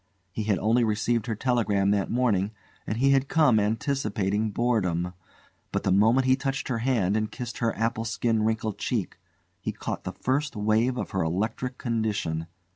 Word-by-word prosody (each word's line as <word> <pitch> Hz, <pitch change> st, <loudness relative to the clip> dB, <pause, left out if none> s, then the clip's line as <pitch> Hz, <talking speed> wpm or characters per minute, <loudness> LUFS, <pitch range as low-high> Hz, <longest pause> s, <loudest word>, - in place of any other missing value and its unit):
He 105 Hz, +4 st, -3 dB
had 105 Hz, -3 st, +2 dB
only 115 Hz, +4 st, +2 dB
received 110 Hz, +2 st, 0 dB
her 115 Hz, -, -1 dB
telegram 105 Hz, -5 st, +1 dB
that 100 Hz, -1 st, +1 dB
morning, 110 Hz, -5 st, +1 dB, 0.3 s
and 105 Hz, -, -2 dB
he 135 Hz, +3 st, +4 dB
had 135 Hz, 0 st, +3 dB
come 145 Hz, -9 st, +4 dB
anticipating 105 Hz, -2 st, 0 dB
boredom; 95 Hz, -7 st, 0 dB, 0.6 s
but -, -, -1 dB
the 95 Hz, -, +1 dB
moment 110 Hz, +7 st, +4 dB
he 130 Hz, 0 st, +5 dB
touched 135 Hz, -1 st, -3 dB
her 120 Hz, -3 st, 0 dB
hand 110 Hz, -6 st, +1 dB
and 110 Hz, -1 st, 0 dB
kissed 120 Hz, +1 st, -6 dB
her 115 Hz, -2 st, 0 dB
apple 115 Hz, 0 st, -1 dB
skin 115 Hz, 0 st, 0 dB
wrinkled 110 Hz, -1 st, -1 dB
cheek, -, -, -2 dB, 0.4 s
he -, -, -3 dB
caught -, -, -5 dB
the -, -, -5 dB
first 140 Hz, +2 st, 0 dB
wave 110 Hz, +4 st, +1 dB
of -, -, -4 dB
her 95 Hz, -, 0 dB
electrical 110 Hz, +10 st, -2 dB
condition. 105 Hz, -9 st, -1 dB
110 Hz, 175 wpm, -26 LUFS, 105-125 Hz, 0.6 s, he